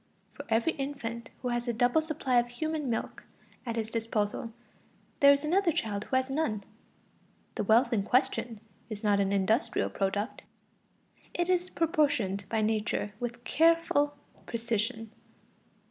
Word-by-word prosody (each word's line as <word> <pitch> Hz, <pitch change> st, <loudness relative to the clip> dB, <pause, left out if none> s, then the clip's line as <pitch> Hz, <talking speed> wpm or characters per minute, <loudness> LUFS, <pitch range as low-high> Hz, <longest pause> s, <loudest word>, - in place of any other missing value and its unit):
For -, -, -9 dB
every 230 Hz, +9 st, +2 dB
infant 240 Hz, -6 st, -5 dB
who 250 Hz, -, 0 dB
has 240 Hz, 0 st, -1 dB
a 240 Hz, -, +1 dB
double 245 Hz, +6 st, +3 dB
supply 295 Hz, -6 st, +1 dB
of 240 Hz, -, 0 dB
human 300 Hz, +3 st, -3 dB
milk 225 Hz, -, -3 dB, 0.4 s
at 230 Hz, -, -2 dB
his 225 Hz, -1 st, -3 dB
disposal, 225 Hz, 0 st, -1 dB, 0.7 s
there 280 Hz, 0 st, +8 dB
is 280 Hz, +1 st, +2 dB
another 350 Hz, +3 st, +2 dB
child 210 Hz, -7 st, -2 dB
who -, -, -2 dB
has 260 Hz, +1 st, +1 dB
none. 255 Hz, -9 st, -1 dB, 0.9 s
The -, -, -2 dB
wealth 230 Hz, +5 st, +4 dB
in 215 Hz, -, +2 dB
question 245 Hz, -1 st, 0 dB, 0.3 s
is 215 Hz, -1 st, -6 dB
not 205 Hz, -1 st, +3 dB
an 195 Hz, -1 st, +1 dB
industrial 220 Hz, +4 st, +1 dB
product. 200 Hz, +3 st, -2 dB, 0.9 s
It 350 Hz, 0 st, 0 dB
is 365 Hz, 0 st, +1 dB
apportioned 285 Hz, -, +1 dB
by 220 Hz, 0 st, +1 dB
Nature 215 Hz, -1 st, -1 dB
with 240 Hz, 0 st, -5 dB
careful 315 Hz, -2 st, +3 dB, 0.3 s
precision. 225 Hz, -1 st, -2 dB
240 Hz, 145 wpm, -30 LUFS, 220-285 Hz, 0.9 s, there